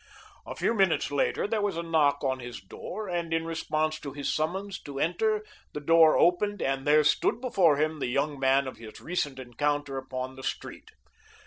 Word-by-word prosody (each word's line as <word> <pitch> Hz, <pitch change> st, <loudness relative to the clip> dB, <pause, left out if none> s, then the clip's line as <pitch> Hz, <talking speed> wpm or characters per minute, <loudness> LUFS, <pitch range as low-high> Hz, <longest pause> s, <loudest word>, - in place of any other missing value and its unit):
A -, -, -6 dB
few -, -, +1 dB
minutes 195 Hz, -9 st, +2 dB
later 145 Hz, -, 0 dB
there 215 Hz, +1 st, 0 dB
was 200 Hz, -4 st, -1 dB
a 170 Hz, -, -2 dB
knock 150 Hz, -4 st, +2 dB
on 130 Hz, -1 st, 0 dB
his 120 Hz, -3 st, -7 dB
door, 190 Hz, -, -7 dB
and 170 Hz, -2 st, -3 dB
in 165 Hz, 0 st, 0 dB
response 155 Hz, -1 st, -1 dB
to 140 Hz, -2 st, -7 dB
his 145 Hz, -1 st, -2 dB
summons 190 Hz, +6 st, -2 dB
to 140 Hz, -1 st, -7 dB
enter 215 Hz, +7 st, 0 dB, 0.3 s
the -, -, -4 dB
door 160 Hz, +1 st, +5 dB
opened, 205 Hz, +4 st, +2 dB
and 135 Hz, -1 st, -1 dB
there 150 Hz, +1 st, +6 dB
stood 150 Hz, +9 st, +2 dB
before 185 Hz, -, +3 dB
him 155 Hz, +1 st, 0 dB
the -, -, -1 dB
young 140 Hz, +3 st, -1 dB
man 135 Hz, +1 st, +3 dB
of 130 Hz, -, -7 dB
his 110 Hz, -2 st, -11 dB
recent 145 Hz, -6 st, -2 dB
encounter 140 Hz, +2 st, -2 dB
upon 130 Hz, 0 st, -6 dB
the -, -, -8 dB
street. -, -, -5 dB
155 Hz, 195 wpm, -28 LUFS, 135-175 Hz, 0.3 s, there